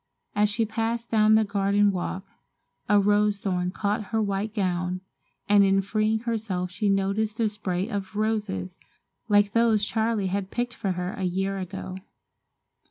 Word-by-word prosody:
As 210 0 +3
she 225 +2 0
passed 225 +2 -2
down 215 -1 +5
the 220 - +5
garden 200 0 +2
walk, 185 +1 -4 0.6
a 205 0 +6
rose 205 +1 +3
thorn 180 -3 -1
caught 205 +2 -2
her 225 +2 -1
white 205 0 -1
gown, 180 -3 -1 0.5
and 205 -1 +6
in 195 0 +4
freeing 215 +2 0
herself 215 -6 -2
she 205 +2 -1
noticed 200 +3 0
a 225 - +3
spray 195 -3 -2
of 200 -2 -5
roses 210 - -2 0.5
like 205 -1 +4
those 225 -2 +3
Charles 220 -3 0
had 195 0 -2
picked 240 +2 -2
for 195 -4 -2
her 180 +1 -3
a - - -7
year 195 +2 -1
ago. 185 0 -6
205 Hz, 160 wpm, -26 LUFS, 190-220 Hz, 0.6 s, a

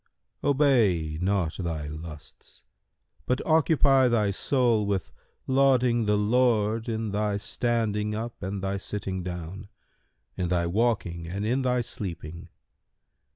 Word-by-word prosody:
Obey 115 - +2
not 95 -4 0
thy 80 -5 -3
lusts, 75 -1 -10 0.6
but 125 +1 +1
occupy 145 -4 +4
thy 110 -4 +2
soul 120 0 +2
with 100 -4 -2 0.3
lauding 130 -4 +3
the 105 0 +3
Lord 110 0 +2
in 110 -2 -2
thy 105 0 0
standing 105 -1 -1
up 115 +2 -5
and 95 +1 -4
thy 95 0 -1
sitting 95 -1 -4
down, 90 +2 -6 0.7
in 90 - -2
thy 85 -1 +1
waking 85 -4 0
and 100 +4 -3
in 125 +5 +1
thy 125 -1 +1
sleeping. 85 -7 -7
105 Hz, 120 wpm, -27 LUFS, 90-120 Hz, 0.7 s, occupy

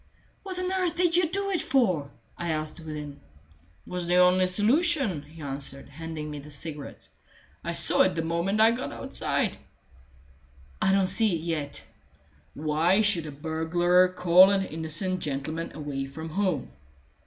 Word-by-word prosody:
"What 375 -2 -7
on 365 0 -2
earth 365 -3 0
did 350 -1 +2
you 350 -2 +3
do 395 +2 0
it 360 - 0
for?" 185 - +1 0.3
I 170 - -4
asked 155 +1 -3
within. 150 -3 -7 0.7
"It - - -15
was 180 -1 -3
the 175 - +2
only 180 +1 +5
solution," 230 - +2
he 155 +2 -13
answered, 135 0 -5
handing 155 +1 -6
me 150 - -6
the 145 +2 -12
cigarettes. 150 0 -6 0.5
"I 170 - -3
saw - - +3
it 185 -1 +3
the 165 - -1
moment 170 +5 -1
I 225 +1 +7
got 240 +2 -4
outside." - - -2 1.2
"I 190 - +3
don't 195 0 +3
see 195 +1 +3
it 160 - -4
yet." 155 -4 -3 0.7
"Why 160 +6 +2
should 185 -7 +3
a - - -6
burglar 165 +4 +2
call 180 +1 +6
an 195 -1 +1
innocent 165 +4 -2
gentleman 155 +2 -4
away 145 -3 -4
from 160 +4 -8
home?" 165 - -1
170 Hz, 160 wpm, -27 LUFS, 155-195 Hz, 1.2 s, I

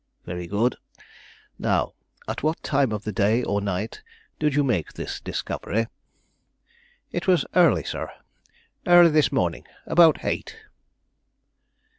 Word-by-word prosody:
"Very 90 0 -5
good. 110 +6 0 0.8
Now - - 0 0.3
at - - -4
what 155 +2 -1
time 135 -4 +1
of 105 -1 -3
the 110 - -3
day 105 +5 +2
or 100 -2 -1
night 100 +2 -3 0.4
did 150 -2 +1
you 145 - +3
make 110 - -1
this - - -5
discovery?" 115 +2 -2 1.3
"It 175 +2 -4
was 180 -2 +3
early, 165 - +4
sir; - - -4 0.8
early 175 -1 +8
this 155 -1 +3
morning, - - -1 0.2
about 165 -3 +4
eight." - - -3
125 Hz, 125 wpm, -24 LUFS, 100-155 Hz, 1.3 s, early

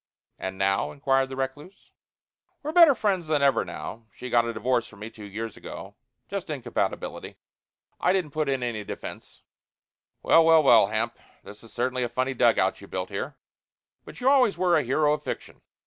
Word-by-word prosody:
"And 95 0 -5
now?" 95 0 +1
inquired 135 -1 +1
the 135 - -6
recluse. 135 +8 -6 0.7
"We're 300 - -3
better 330 -4 +7
friends 190 -7 0
than 150 -2 +1
ever 135 -4 +3
now. 115 0 -8
She 125 - -8
got 120 -1 +4
a 115 - -2
divorce 120 +1 0
from 100 - -16
me 110 +2 -8
two 110 -2 -11
years 110 +2 -6
ago. - - -9 0.3
Just - - -5
incompatibility. - - -3 0.6
I - - +3
didn't 185 -6 0
put 155 -1 -1
in 135 -2 -1
any 115 -3 -3
defence. - - -9 0.8
Well, 165 - +6
well, 160 -1 +6
well, 135 - +6
Hamp, 115 +2 -2 0.2
this 105 +2 -13
is 115 - -15
certainly 125 +1 -1
a 120 - -1
funny 130 +2 -1
dugout 125 - +2
you've - - -13
built - - -4
here. - - -5 0.7
But - - -12
you 250 - -1
always 265 -6 +4
were 180 -2 +3
a 155 - +4
hero 150 +3 +2
of 150 - -3
fiction. - - -6
130 Hz, 185 wpm, -26 LUFS, 115-155 Hz, 0.8 s, better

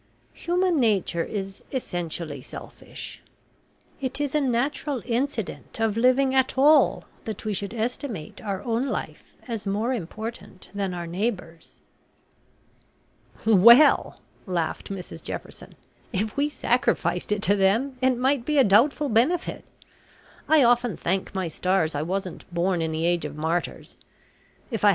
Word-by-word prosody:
Human 350 -1 +1
nature 200 -7 +1
is 195 -1 -6
essentially 170 - -4
selfish. - - -10 0.8
It 270 +1 -3
is 290 -2 -1
a 300 - +2
natural 270 +1 -1
incident 240 -3 -3
of 225 -2 +1
living 255 +3 +3
at 265 0 +2
all 295 +3 +5 0.2
that 220 -2 -6
we 215 - -1
should 200 +3 -4
estimate 225 - -4
our 200 -2 -3
own 235 +3 0
life - - -5
as 225 -4 -4
more 215 +6 0
important 215 -1 -7
than 195 -3 -2
our 175 -1 -4
neighbours." 175 -3 -4 1.7
"Well," 235 +7 +6 0.3
laughed 170 -3 -2
Mrs 190 -3 -7
Jefferson, - - -8 0.4
"if 210 +3 -2
we 285 +1 +1
sacrificed 210 - 0
it 210 0 0
to 205 -1 +4
them, 215 +8 +2
it 260 -1 +3
might 260 0 +1
be 300 +3 0
a 270 - +7
doubtful 260 +9 +4
benefit. 275 +10 +1 0.9
I 310 -3 +6
often 240 -3 +3
thank 190 +2 -2
my 190 -2 -1
stars 175 0 0
I 145 - -2
wasn't 185 +2 -4
born 175 0 0
in 160 0 -1
the 160 +1 -1
age 175 -2 +1
of 150 -1 -5
martyrs. 160 +3 -3 0.7
If 225 - -2
J. 210 - +6
215 Hz, 140 wpm, -25 LUFS, 180-260 Hz, 1.7 s, a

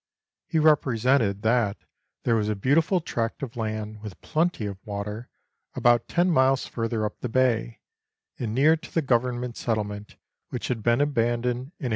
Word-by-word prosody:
He 165 - -1
represented 130 -8 +3
that 110 -3 +2 0.5
there 115 - +2
was 105 -1 0
a 105 - 0
beautiful 160 - +2
tract 115 -4 -3
of 125 -4 -6
land, 110 -2 -4
with 105 -4 -9
plenty 160 -7 0
of 100 -2 -5
water, 105 +2 -5 0.5
about 120 -1 +3
ten 175 +1 +2
miles 135 -3 +3
further 115 -2 -2
up 105 - -5
the 125 - -4
bay, 120 -2 +1 0.6
and 115 -3 -3
near 150 +5 +5
to 160 0 -11
the 165 - 0
Government 125 -1 0
settlement 105 -2 -3 0.3
which - - -4
had 120 -3 -1
been 120 +4 +2
abandoned 120 -4 +1
in 120 - -3
1827. 135 +1 -7
120 Hz, 165 wpm, -26 LUFS, 110-135 Hz, 0.6 s, near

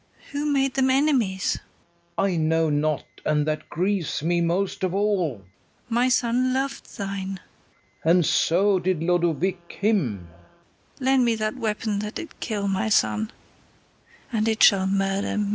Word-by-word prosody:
Who 290 +1 -1
made 270 -2 +1
them 265 -1 +2
enemies? 260 - +1 0.6
FERNEZE. 195 -1 +1
I - - -1
know 160 0 +1
not; 150 0 0 0.2
and 150 -1 +1
that 155 0 -3
grieves 175 -5 -1
me 170 +1 +1
most 180 +4 -1
of 185 0 0
all. 200 -7 +1
KATHARINE. - - -25 0.4
My 240 +2 +2
son 250 0 +2
lov'd 270 +1 -4
thine. 195 -1 -4 0.6
FERNEZE. 165 +2 +4
And 175 -3 +3
so 190 +6 +3
did 180 -2 -1
Lodowick 175 +1 0
him. 145 - 0 0.7
KATHARINE. 260 - -6
Lend 265 -1 +4
me 230 -1 +2
that 215 +2 -2
weapon 215 -3 -2
that 210 +1 -5
did 330 - -8
kill 205 -4 -2
my 195 +3 0
son, 215 +1 +1 1.0
And 220 0 +1
it 220 -1 +2
shall 190 -2 +6
murder 195 +1 0
me. 205 -1 0
195 Hz, 160 wpm, -24 LUFS, 170-225 Hz, 1.0 s, shall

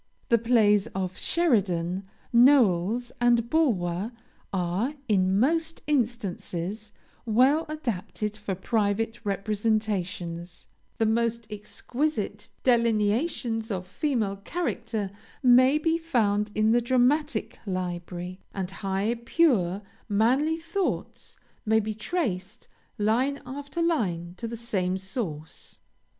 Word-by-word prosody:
The 235 - +5
plays 215 -4 +4
of 185 -1 -2
Sheridan, 195 - +1 0.3
Knowles, 235 -3 +4
and 240 -1 +4
Bulwer, 205 - +1 0.4
are, 190 - -1
in 190 -2 +3
most 325 +6 +1
instances, 215 - -2 0.4
well 260 +8 +4
adapted 215 - -3
for 210 -3 -4
private 215 +3 -1
representations 200 -5 -2 0.3
the 225 - +2
most 230 +1 +1
exquisite 210 +1 -3
delineations 230 0 +1
of 185 -3 -3
female 215 -1 -1
character 225 - -3 0.3
may 255 +3 +6
be 325 +2 +1
found 215 -10 +1
in 215 +1 +3
the 240 +1 +4
dramatic 255 +1 +1
library, 180 0 -4 0.2
and 190 -2 -3
high, 195 +4 -1
pure, 210 - +2 0.3
manly 255 +10 +2
thoughts, 335 +4 -3 0.3
may 220 +1 +3
be 215 0 -2
traced, 215 - -3 0.3
line 245 +7 +1
after 285 +5 -4
line, 180 - 0
to 230 - -4
the 230 0 -5
same 190 -5 -1
source. 190 - -6
220 Hz, 105 wpm, -27 LUFS, 195-250 Hz, 0.4 s, may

